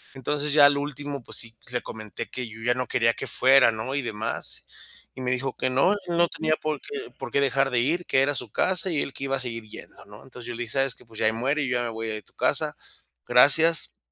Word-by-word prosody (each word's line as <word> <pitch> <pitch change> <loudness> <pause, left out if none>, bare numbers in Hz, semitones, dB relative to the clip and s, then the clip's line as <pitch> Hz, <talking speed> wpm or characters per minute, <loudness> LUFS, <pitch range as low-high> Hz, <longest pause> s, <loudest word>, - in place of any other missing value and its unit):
entonces 145 +2 -1
ya 145 -2 +8
al 145 0 +5
último, 145 -1 -5
pues, - - -1
sí 115 0 0 0.2
le 120 - -1
comenté 110 -2 -7
que 125 -1 -5
yo 110 +1 -11
ya 120 0 +3
no 125 -1 -2
quería 115 -1 +2
que - - -6
fuera, 130 -1 +5
¿no?, 110 +5 -3
y 140 - 0
demás 110 -1 -3 0.5
y - - -10
me 125 0 -1
dijo 130 +1 -2
que 130 - 0
no 135 +9 +3
él 175 -4 +1
tenía 155 -1 +1
por 155 -1 -3
qué 425 0 -7
por 135 -3 -6
qué 140 - +2
dejar 135 0 +1
de 120 - +2
ir, 165 +8 0
que 135 - +3
era 145 +1 +1
su 120 -3 -4
casa 190 0 +1
y 150 - 0
él - - -3
que 140 - -6
iba 135 0 0
a - - -4
seguir 115 -3 -5
yendo, - - -11
¿no?, 105 +1 -14
entonces 125 -2 -12
yo 120 - -5
le 120 - -3
dije: 110 - -7
"¿Sabes 135 -2 +1
que?, - - -17
pues, 110 -1 -12
ya - - +1
ahí 110 - +2
muere 140 +6 0
y 130 - -2
ya 120 -1 0
me 120 - -3
voy 115 0 -5
de 110 -1 -4
tu - - -21
casa, - - 0 0.5
gracias 160 +6 +5
130 Hz, 265 wpm, -25 LUFS, 120-145 Hz, 0.5 s, ya